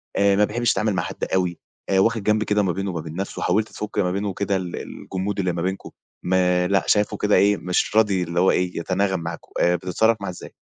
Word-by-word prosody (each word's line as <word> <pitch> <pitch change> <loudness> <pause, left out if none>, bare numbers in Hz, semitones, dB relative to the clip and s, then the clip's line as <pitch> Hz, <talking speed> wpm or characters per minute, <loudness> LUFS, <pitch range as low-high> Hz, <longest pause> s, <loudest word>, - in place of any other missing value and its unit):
آآ 100 0 +4
ما 105 +1 +4
بيحبّش 120 +2 0
يتعامل 110 -2 0
مع 95 - -1
حد - - -7
أوي، 90 -2 0 0.3
آآ 95 -1 +3
واخِد 115 0 +2
جنب 110 +1 +2
كده 105 -1 +1
ما 95 - +1
بينه 95 +2 -3
ما 85 -2 -4
بين 80 0 -8
نَفْسه 95 +2 -4
وحاولت 105 +5 +1
تفُك 105 0 -7
ما 90 -2 +1
بينه 100 +2 -2
وكده 100 +1 -1
ال 90 -2 -3
الجمود 95 +2 -5
اللي 90 -2 +1
ما 85 - -3
بينكم، 95 +2 -3 0.3
ما 90 0 +2
لأ، 95 -1 +2
شايفه 105 -1 +2
كده 105 0 +2
إيه، 100 0 +4
مش 90 +3 -1
راضي 100 -5 +3
اللي 85 +1 -2
هو 95 - +4
إيه، 90 0 -1
يتناغم 95 +1 0
معاكم، 85 0 -7
آآ 90 0 +4
بتتصرّف 95 +6 +1
معاه 100 - -3
إزاي؟ 90 - -10
95 Hz, 235 wpm, -23 LUFS, 90-105 Hz, 0.3 s, آآ